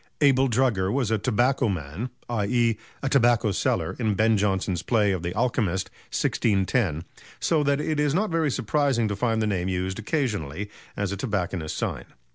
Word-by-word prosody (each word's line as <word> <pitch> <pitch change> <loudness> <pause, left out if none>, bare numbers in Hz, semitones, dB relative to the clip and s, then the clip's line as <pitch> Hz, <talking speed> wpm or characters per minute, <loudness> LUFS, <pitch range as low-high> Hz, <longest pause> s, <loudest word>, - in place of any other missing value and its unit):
Abel 135 -2 +5
Drugger 115 -6 +1
was 125 -3 0
a 110 - +2
"tobacco 125 +2 +2
man," 90 - -4 0.2
i.e. 115 0 +1 0.2
a - - 0
tobacco 120 -5 +3
seller - - 0
in 110 -4 +1
Ben 110 +2 +3
Jonson's 95 -3 0
play 105 +2 +2
of 95 -3 -1
"The 85 0 -3
Alchemist," 105 -6 0 0.2
1610, 95 - +1 0.4
so 160 -2 +2
that 140 -1 +1
it 150 0 -1
is 150 0 +2
not 210 +1 +1
very 160 -2 +1
surprising 125 -1 +1
to 105 - -2
find 110 +1 0
the - - +1
name 95 -4 -1
used 95 +2 -2
occasionally 105 - -2 0.3
as 100 -1 -1
a 100 - -3
tobacconist's 90 -6 -2
sign. - - -3
110 Hz, 170 wpm, -25 LUFS, 95-130 Hz, 0.4 s, Abel